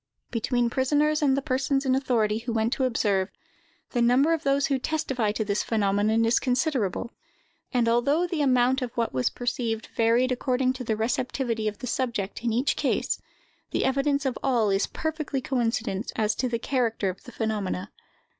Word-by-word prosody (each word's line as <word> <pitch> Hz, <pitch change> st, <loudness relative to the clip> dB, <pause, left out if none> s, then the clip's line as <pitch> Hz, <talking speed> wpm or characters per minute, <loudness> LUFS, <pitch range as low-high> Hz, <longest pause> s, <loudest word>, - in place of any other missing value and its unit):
Between 240 Hz, +1 st, 0 dB
prisoners 295 Hz, +4 st, +2 dB
and 275 Hz, -2 st, +3 dB
the 275 Hz, -, -1 dB
persons 270 Hz, 0 st, 0 dB
in 260 Hz, -, +3 dB
authority 230 Hz, -5 st, +1 dB
who 240 Hz, +1 st, -4 dB
went 225 Hz, +2 st, +1 dB
to 265 Hz, -, 0 dB
observe, 205 Hz, -5 st, +1 dB, 0.6 s
the 240 Hz, -, 0 dB
number 255 Hz, +7 st, +4 dB
of 325 Hz, -, -1 dB
those 275 Hz, 0 st, +2 dB
who 275 Hz, -2 st, 0 dB
testify 265 Hz, -7 st, -1 dB
to 220 Hz, 0 st, -2 dB
this 200 Hz, 0 st, 0 dB
phenomenon 215 Hz, +1 st, +1 dB
is 230 Hz, +1 st, +3 dB
considerable; 250 Hz, -, 0 dB, 0.6 s
and, 240 Hz, -2 st, +2 dB
although 280 Hz, +9 st, +2 dB
the 335 Hz, -3 st, -2 dB
amount 255 Hz, -1 st, +3 dB
of 250 Hz, -2 st, -3 dB
what 230 Hz, -1 st, 0 dB
was 130 Hz, -1 st, +1 dB
perceived 235 Hz, -2 st, -3 dB
varied 235 Hz, +3 st, +3 dB
according 255 Hz, 0 st, +1 dB
to 255 Hz, -1 st, -6 dB
the 220 Hz, -2 st, -1 dB
receptivity 230 Hz, 0 st, -1 dB
of 210 Hz, -1 st, -3 dB
the -, -, -7 dB
subject 235 Hz, -5 st, -2 dB
in 235 Hz, -, +1 dB
each 245 Hz, +5 st, +1 dB
case, -, -, 0 dB, 0.5 s
the -, -, 0 dB
evidence 275 Hz, +1 st, +1 dB
of 260 Hz, -3 st, -1 dB
all 235 Hz, -6 st, +2 dB
is 195 Hz, +1 st, +1 dB
perfectly 310 Hz, -3 st, -3 dB
coincident 235 Hz, -5 st, -1 dB
as 215 Hz, -2 st, +1 dB
to 255 Hz, +3 st, -1 dB
the 235 Hz, -, 0 dB
character 230 Hz, -4 st, 0 dB
of 185 Hz, 0 st, -4 dB
the 245 Hz, -, -10 dB
phenomena. 205 Hz, -4 st, -2 dB
245 Hz, 180 wpm, -26 LUFS, 220-270 Hz, 0.6 s, number